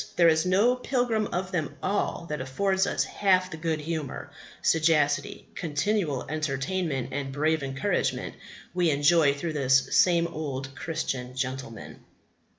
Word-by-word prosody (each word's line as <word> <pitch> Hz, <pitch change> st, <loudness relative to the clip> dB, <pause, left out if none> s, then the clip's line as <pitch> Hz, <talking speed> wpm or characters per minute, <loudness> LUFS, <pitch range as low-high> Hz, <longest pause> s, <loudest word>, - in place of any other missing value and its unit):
there 170 Hz, -1 st, +6 dB
is 160 Hz, +2 st, +2 dB
no 205 Hz, +7 st, +4 dB
pilgrim 245 Hz, -4 st, 0 dB
of 185 Hz, +1 st, -3 dB
them 165 Hz, -5 st, -3 dB
all 195 Hz, -3 st, -1 dB
that 150 Hz, -4 st, -4 dB
affords 190 Hz, +9 st, 0 dB
us -, -, +1 dB
half 185 Hz, -2 st, +1 dB
the 160 Hz, -, -6 dB
good 160 Hz, -1 st, -1 dB
humour, 155 Hz, -2 st, -5 dB, 0.3 s
sagacity, 155 Hz, +3 st, +2 dB
continual 165 Hz, -3 st, -1 dB
entertainment, 150 Hz, -1 st, -2 dB
and 135 Hz, 0 st, -3 dB
brave 155 Hz, +3 st, +1 dB
encouragement 135 Hz, 0 st, -1 dB, 0.4 s
we 175 Hz, -2 st, +2 dB
enjoy 145 Hz, +1 st, +4 dB
through 150 Hz, +3 st, -4 dB
this 135 Hz, -2 st, +2 dB
same 170 Hz, -2 st, +4 dB
old 140 Hz, -5 st, -5 dB
Christian 135 Hz, -6 st, -4 dB
gentleman. 130 Hz, -4 st, -5 dB
155 Hz, 135 wpm, -27 LUFS, 140-185 Hz, 0.4 s, there